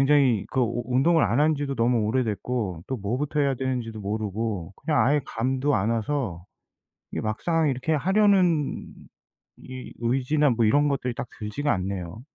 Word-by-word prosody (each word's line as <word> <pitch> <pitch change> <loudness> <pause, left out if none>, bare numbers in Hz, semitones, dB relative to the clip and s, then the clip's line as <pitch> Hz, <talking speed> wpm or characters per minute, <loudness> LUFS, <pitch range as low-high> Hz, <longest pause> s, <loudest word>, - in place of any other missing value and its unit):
굉장히 125 -8 +3
그 130 - +1
우 120 0 -1
운동을 145 +6 +3
안 - - +1
한 155 +1 +3
지도 140 -1 -3
너무 115 -1 +2
오래됐고 110 -5 -2
또 130 - -2
뭐부터 130 +9 -2
해야 140 -1 +1
되는지도 125 -4 -3
모르고 105 -2 -3
그냥 145 -8 +1
아예 145 +3 +3
감도 130 +4 0
안 105 +3 +1
와서 115 - -2 0.7
이게 - - -2
막상 160 +9 0
이렇게 135 +4 -1
하려는 185 -2 +2 0.7
이 130 -1 -9
의지나 135 +5 +2
뭐 115 -1 +2
이런 145 +7 +3
것들이 130 -3 -1
딱 120 - -5
들지가 125 +7 -1
않네요. 95 +1 -4
125 Hz, 325 characters per minute, -25 LUFS, 110-145 Hz, 0.7 s, 굉장히